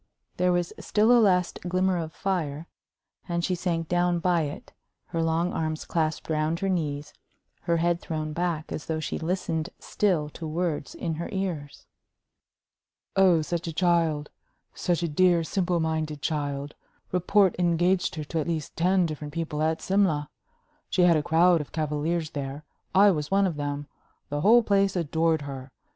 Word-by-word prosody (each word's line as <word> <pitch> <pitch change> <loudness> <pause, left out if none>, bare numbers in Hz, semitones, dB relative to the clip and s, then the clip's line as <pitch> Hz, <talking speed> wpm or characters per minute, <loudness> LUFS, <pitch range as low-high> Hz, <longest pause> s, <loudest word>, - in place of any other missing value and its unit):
There 180 0 +3
was 175 -1 0
still 215 +3 +2
a 240 -1 +7
last 180 -4 +2
glimmer 185 0 +1
of 160 -1 -4
fire, 165 -6 -2 0.6
and 170 0 0
she 185 - 0
sank 170 -2 -1
down 175 0 +2
by 175 0 +2
it, 145 - -8 0.4
her 165 - -1
long 165 +2 +1
arms 155 -1 -2
clasped 160 -2 -1
round 155 +1 0
her 195 - 0
knees, 150 -5 -2 0.5
her 170 -1 +1
head 170 +1 +1
thrown 155 -1 -4
back 170 -2 -2
as 150 - -5
though 160 -1 -1
she 155 - -3
listened 165 -1 -2
still 180 -8 0
to 160 +2 -7
words 160 -2 -2
in 165 - -3
her - - -4
ears. 175 -7 -4 1.3
"Oh, 185 -5 +5
such 170 +1 -3
a 165 - -3
child! 165 -3 +1 0.4
Such 175 -1 -1
a - - +1
dear, 170 +2 +3
simple 175 0 0
minded 160 -2 -1
child! 145 -2 -2 0.4
Report 185 +1 +3
engaged 175 +1 +2
her 155 - -4
to 160 +2 -3
at 155 - -2
least 160 -3 -3
ten 185 +2 +3
different 150 -1 -6
people 160 -2 -2
at 160 +1 0
Simla. 185 -7 +1 0.6
She 180 - +2
had 175 -2 +6
a 155 - +2
crowd 170 +2 +4
of 145 - -9
cavaliers 155 +1 -1
there 140 +1 -5 0.3
I 200 +1 +7
was 150 -4 -2
one 195 0 +3
of 175 -4 -1
them. 145 0 -3 0.4
The 145 0 -2
whole 230 +6 +6
place 195 -2 +2
adored 160 -2 +1
her. 135 -1 -7
165 Hz, 170 wpm, -26 LUFS, 155-180 Hz, 1.3 s, a